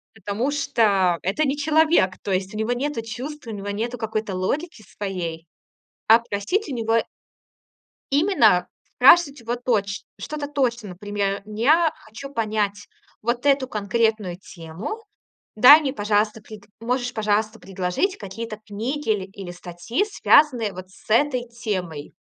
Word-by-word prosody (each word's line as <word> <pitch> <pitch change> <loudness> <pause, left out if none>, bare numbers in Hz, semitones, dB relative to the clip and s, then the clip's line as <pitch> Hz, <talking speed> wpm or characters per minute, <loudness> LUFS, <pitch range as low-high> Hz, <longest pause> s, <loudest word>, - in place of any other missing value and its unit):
потому 210 +6 -2
что 215 -11 +2
это 195 - 0
не 275 +1 -1
человек. 305 - +3
То 200 - -4
есть 190 +2 -1
у - - -4
него 220 +3 0
нету 275 0 -2
чувств, 255 +5 -7
у - - -5
него 205 -1 -6
нету 230 +4 -3
какой-то 220 -3 -3
логики 245 - -3
своей. 175 -5 -4 0.6
А 225 +2 +8
просить 235 - -2
у 275 - -4
него 230 -1 +1 1.1
именно. 280 - +4 0.3
Спрашивать 280 +2 +6
его 235 0 -3
точ 215 -5 -1 0.2
что-то 295 -2 -5
точно. 240 -7 -1
Например: 200 +1 -3
"Я 285 +11 +3
хочу 275 +6 -10
понять 210 -3 -2 0.3
вот 240 +3 -2
эту 275 -2 +3
конкретную 210 -3 0
тему. 185 - -8 0.5
Дай 270 +8 +9
мне, 270 -3 -2
пожалуйста, 210 -1 0
пред 210 -1 -12 0.2
можешь, 245 +2 -2
пожалуйста, 215 -1 0
предложить 190 - -2
какие-то 215 +2 -7
книги 235 +7 -4
ил 195 -3 -2
или 195 -3 -8
статьи, 175 - -3
связанные 270 - +3
вот 185 0 -9
с 190 - -20
этой 250 0 +2
темой?" 190 -11 -4
220 Hz, 140 wpm, -23 LUFS, 200-270 Hz, 1.1 s, Дай